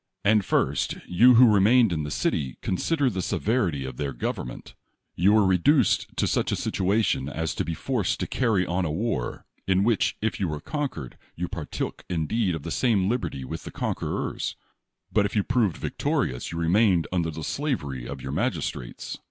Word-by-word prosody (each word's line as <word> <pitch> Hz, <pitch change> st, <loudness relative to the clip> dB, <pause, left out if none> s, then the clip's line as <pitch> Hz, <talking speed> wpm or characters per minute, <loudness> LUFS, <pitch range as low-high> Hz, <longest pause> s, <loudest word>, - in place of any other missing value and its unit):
And 105 Hz, 0 st, +4 dB
first, -, -, 0 dB
you 120 Hz, +8 st, +6 dB
who 115 Hz, -2 st, +7 dB
remained 110 Hz, +1 st, +5 dB
in 80 Hz, -, -1 dB
the 75 Hz, -, -4 dB
city, 65 Hz, -3 st, -1 dB
consider 145 Hz, -, 0 dB
tlie 95 Hz, -7 st, -1 dB
severity 90 Hz, -, 0 dB
of 65 Hz, -2 st, -7 dB
their 70 Hz, -3 st, -3 dB
gov -, -, -1 dB
ernment. -, -, -9 dB, 0.4 s
You 95 Hz, +4 st, +3 dB
were 110 Hz, -2 st, +5 dB
reduced 100 Hz, -, +3 dB
to -, -, +2 dB
such -, -, 0 dB
a -, -, +1 dB
situation 95 Hz, -7 st, 0 dB
as 80 Hz, +2 st, -2 dB
to -, -, -2 dB
be 85 Hz, +1 st, -3 dB
forced 120 Hz, -5 st, -1 dB
to -, -, 0 dB
carry 110 Hz, -8 st, +1 dB
on 90 Hz, +2 st, -1 dB
a 85 Hz, -, -1 dB
war, 80 Hz, -, -2 dB, 0.2 s
in 95 Hz, 0 st, +3 dB
which, 115 Hz, -2 st, +1 dB
if 110 Hz, +1 st, -2 dB
you 95 Hz, -, 0 dB
were 75 Hz, -2 st, -3 dB
conquered, 130 Hz, -, -5 dB, 0.2 s
you 90 Hz, +2 st, -3 dB
partook 85 Hz, -5 st, -5 dB
indeed 90 Hz, +3 st, 0 dB
of 80 Hz, -, -7 dB
the 85 Hz, -, -5 dB
same 105 Hz, -5 st, +2 dB
liberty 110 Hz, -, -2 dB
with -, -, -6 dB
the -, -, -7 dB
conquerers; -, -, -3 dB, 0.6 s
but 105 Hz, -2 st, +3 dB
if 100 Hz, -, -9 dB
you 105 Hz, -, +3 dB
proved 115 Hz, -7 st, +1 dB
victorious, 60 Hz, 0 st, -2 dB
you 85 Hz, -, -5 dB
remained 90 Hz, 0 st, +3 dB
under 85 Hz, -3 st, 0 dB
the 80 Hz, 0 st, -6 dB
sla 140 Hz, -, -1 dB
very 65 Hz, -4 st, -6 dB
of 70 Hz, -2 st, -7 dB
your 65 Hz, -, -4 dB
magistrates. -, -, -3 dB
95 Hz, 190 wpm, -26 LUFS, 80-110 Hz, 0.6 s, who